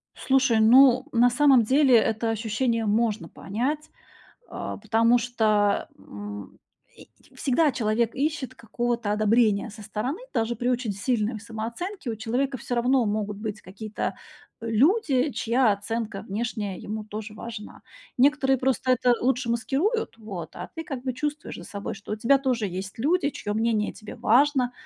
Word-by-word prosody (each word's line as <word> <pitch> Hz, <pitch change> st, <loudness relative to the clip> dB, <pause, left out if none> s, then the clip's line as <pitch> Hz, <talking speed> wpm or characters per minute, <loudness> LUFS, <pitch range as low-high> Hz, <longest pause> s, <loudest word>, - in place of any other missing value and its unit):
Слушай, 265 Hz, -4 st, +2 dB
ну, 255 Hz, +3 st, +6 dB
на 245 Hz, +1 st, +5 dB
самом 265 Hz, -1 st, +5 dB
деле, 265 Hz, +1 st, +4 dB
это 225 Hz, +1 st, +1 dB
ощущение 225 Hz, +1 st, -1 dB
можно 215 Hz, 0 st, 0 dB
понять, 285 Hz, +10 st, -3 dB, 0.6 s
а, -, -, -5 dB
потому 230 Hz, +1 st, +3 dB
что, 215 Hz, -4 st, +1 dB
м, 100 Hz, +1 st, -9 dB, 0.4 s
и -, -, -14 dB, 0.3 s
всегда 285 Hz, +3 st, +2 dB
человек 225 Hz, +1 st, 0 dB
ищет 285 Hz, -2 st, -2 dB
какого-то 235 Hz, -1 st, -2 dB
одобрения 215 Hz, 0 st, +2 dB
со 215 Hz, +1 st, -11 dB
стороны. 220 Hz, -, -3 dB
Даже 235 Hz, -1 st, 0 dB
при 245 Hz, +3 st, -3 dB
очень 245 Hz, -4 st, 0 dB
сильной 215 Hz, +1 st, -1 dB
самооценке 235 Hz, -, -5 dB
у 225 Hz, -, -2 dB
человека 255 Hz, +5 st, -1 dB
всё 245 Hz, +1 st, -5 dB
равно 245 Hz, 0 st, +2 dB
могут 210 Hz, -1 st, -2 dB
быть 210 Hz, -1 st, -5 dB
какие-то, 210 Hz, +3 st, -5 dB, 0.5 s
э, 230 Hz, -, -5 dB
люди, 280 Hz, -, +3 dB
чья 230 Hz, +1 st, +2 dB
оценка 210 Hz, 0 st, -3 dB
внешняя 205 Hz, -2 st, -3 dB
ему 215 Hz, +1 st, -5 dB
тоже 215 Hz, 0 st, -7 dB
важна. 220 Hz, -1 st, -8 dB, 0.4 s
Некоторые 270 Hz, 0 st, +3 dB
просто 255 Hz, 0 st, +1 dB
это 250 Hz, 0 st, +3 dB
лучше 250 Hz, -1 st, 0 dB
маскируют, 280 Hz, -, -1 dB
вот, 205 Hz, -6 st, -8 dB
а -, -, -7 dB
ты 325 Hz, -, -4 dB
как 275 Hz, -7 st, -6 dB
бы 260 Hz, -1 st, -2 dB
чувствуешь 295 Hz, +3 st, -4 dB
за -, -, -9 dB
собой, 200 Hz, 0 st, -5 dB
что 205 Hz, +1 st, -7 dB
у -, -, -1 dB
тебя 260 Hz, +5 st, +3 dB
тоже 250 Hz, -5 st, 0 dB
есть 190 Hz, +1 st, -5 dB
люди, 295 Hz, +5 st, +1 dB
чьё 205 Hz, -7 st, -4 dB
мнение 220 Hz, -1 st, 0 dB
тебе 215 Hz, -, -10 dB
важно. 255 Hz, +1 st, +3 dB
235 Hz, 155 wpm, -25 LUFS, 215-260 Hz, 0.6 s, ну